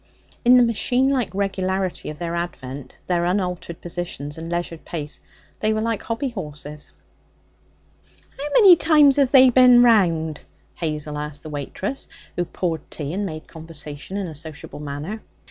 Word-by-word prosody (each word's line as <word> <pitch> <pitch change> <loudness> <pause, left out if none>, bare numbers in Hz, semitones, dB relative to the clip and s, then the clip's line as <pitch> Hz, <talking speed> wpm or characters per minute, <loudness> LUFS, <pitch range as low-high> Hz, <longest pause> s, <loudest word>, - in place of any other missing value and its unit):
In 250 0 +7
the 250 - +7
machine 245 +3 +2
like 260 -6 +1
regularity 190 -1 -1
of 150 - -7
their 170 +1 -4
advent, 140 -6 -5
their 175 -1 +1
unaltered 180 -2 -2
positions, 170 -4 -5
and 165 +1 -7
leisured 170 -1 -3
pace, 150 -3 -6 0.4
they 215 0 +1
were 215 - 0
like 225 -2 -1
hobby 230 +4 -2
horses. 150 - -7 1.4
'How 285 +2 -4
many 400 -7 +9
times 300 -4 +5
have 275 -3 +3
they 260 -2 +8
bin 250 -1 +7
round?' 170 -10 +3 0.3
Hazel 150 -2 -3
asked 150 -1 -6
the 155 - -8
waitress, 150 - -4 0.3
who 175 - 0
poured 165 -3 -3
tea 150 0 -5
and 200 +2 -1
made 155 -2 -7
conversation 160 +1 -7
in 200 - -2
a 165 - -6
sociable 155 -1 -9
manner. 150 +9 -5
175 Hz, 155 wpm, -22 LUFS, 155-230 Hz, 1.4 s, many